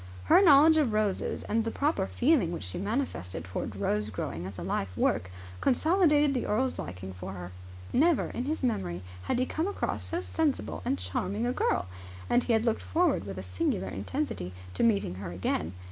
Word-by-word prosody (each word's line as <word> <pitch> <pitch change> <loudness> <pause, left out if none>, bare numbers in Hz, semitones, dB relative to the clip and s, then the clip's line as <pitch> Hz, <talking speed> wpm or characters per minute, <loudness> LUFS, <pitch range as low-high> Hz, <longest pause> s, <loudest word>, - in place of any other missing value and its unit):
Her 370 - +6
knowledge 315 -2 +7
of 275 -8 +2
roses 215 -2 0
and 225 +1 0
the 225 - -1
proper 275 -6 0
feeling 245 - +2
which 170 - -4
she 90 - -5
manifested 200 - -2
towards 95 +2 -4
rose 105 +2 0
growing 90 -3 -4
as 95 -1 -8
a 85 - -5
life 90 0 -2
work 90 - +1 0.3
consolidated 300 0 +3
the 250 - -1
earl's 255 +5 0
liking 90 +1 -6
for 90 +1 -7
her. 90 -1 -7 0.4
Never, 320 +3 +3
in 245 - -3
his 305 0 -2
memory, 90 - -1 0.2
had - - 0
he 255 - +2
come 320 +6 -1
across 405 - -2
so 335 - -1
sensible 320 -5 -1
and 90 - +1
charming 185 - -2
a 245 - 0
girl; 90 - +1 0.5
and 245 0 +4
he 240 - +2
had 220 +1 +2
looked 230 -2 +1
forward 335 - +1
with 95 -1 -6
a 95 - -5
singular 90 +1 -1
intensity 95 - -3 0.2
to - - -1
meeting 210 - +2
her 85 - -5
again. 90 -2 -1
215 Hz, 190 wpm, -29 LUFS, -, 0.5 s, knowledge